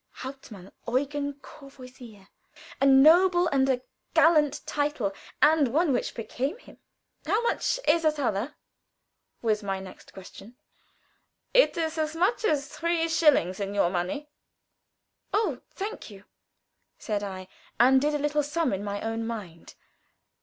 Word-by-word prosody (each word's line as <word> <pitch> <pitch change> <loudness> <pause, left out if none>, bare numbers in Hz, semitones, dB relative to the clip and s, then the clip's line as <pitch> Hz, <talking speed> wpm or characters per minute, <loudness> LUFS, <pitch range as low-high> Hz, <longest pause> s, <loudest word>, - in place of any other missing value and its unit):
Hauptmann 230 -8 -10 0.2
Eugen 285 +3 -1
Courvoisier 250 -7 -14 0.5
a 275 - +3
noble 350 +7 +6
and 270 -1 +2
a 255 -1 0 0.3
gallant 300 -3 +4
title, 290 -9 -1 0.3
and 300 -2 +5
one 300 +4 +1
which 245 - -2
became 260 - -3
him. - - -18 0.5
"How 425 - +2
much 475 - 0
is 330 +2 +4
a 310 - +4
thaler?" 255 -3 -2 0.9
was 215 -2 +1
my 195 -2 -3
next 190 -1 -12
question. 195 +5 -13 1.0
"It - - +4
is 325 -1 -2
as 310 0 -2
much 380 +8 +1
as 295 -6 +1
three 330 +2 -1
shillings 290 - +3
in 200 0 -4
your 180 -3 +2
money." 185 +12 -3 1.1
"Oh, 435 +1 0
thank 410 - -6
you," 200 -2 -13 0.7
said 210 -2 -3
I, 190 -2 -6 0.3
and 260 +2 +6
did 295 +1 +1
a - - +2
little 295 +1 0
sum 295 -1 -1
in 195 +1 -3
my 205 0 -4
own 225 0 -3
mind. 190 -8 -8
275 Hz, 140 wpm, -27 LUFS, 210-310 Hz, 1.1 s, noble